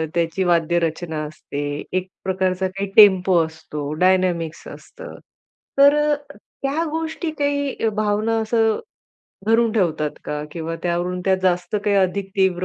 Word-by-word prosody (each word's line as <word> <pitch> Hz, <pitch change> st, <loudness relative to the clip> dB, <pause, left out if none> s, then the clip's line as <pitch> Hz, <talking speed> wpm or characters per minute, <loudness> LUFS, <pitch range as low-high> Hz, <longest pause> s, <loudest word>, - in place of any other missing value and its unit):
त्याची 170 Hz, +2 st, 0 dB
वाद्य 170 Hz, -1 st, +2 dB
रचना 160 Hz, -1 st, -3 dB
असते, 145 Hz, -1 st, -5 dB
एक 185 Hz, 0 st, -1 dB, 0.2 s
प्रकारचा 190 Hz, 0 st, 0 dB
काही 195 Hz, +1 st, -5 dB
टेम्पो 190 Hz, -3 st, +7 dB
असतो, 150 Hz, -2 st, -7 dB
डायनामिक्स 180 Hz, -1 st, +1 dB
असतं. -, -, -11 dB, 0.6 s
तर 285 Hz, +1 st, +7 dB, 0.2 s
अ, 295 Hz, -, +3 dB, 0.5 s
त्या 280 Hz, +4 st, 0 dB
गोष्टी 320 Hz, +1 st, -3 dB
काही 285 Hz, -5 st, 0 dB
भावना 215 Hz, +1 st, 0 dB
असं 225 Hz, 0 st, +1 dB, 0.7 s
धरून 225 Hz, 0 st, +3 dB
ठेवतात 165 Hz, -8 st, 0 dB
का? 150 Hz, 0 st, -3 dB
किंवा 165 Hz, 0 st, -4 dB
त्यावरून 175 Hz, +1 st, -1 dB
त्या 190 Hz, -1 st, +4 dB
जास्त 180 Hz, +1 st, +1 dB
काही 205 Hz, -1 st, +2 dB
अधिक 195 Hz, 0 st, +1 dB
तीव्र 185 Hz, -2 st, +2 dB
185 Hz, 135 wpm, -21 LUFS, 170-220 Hz, 0.7 s, टेम्पो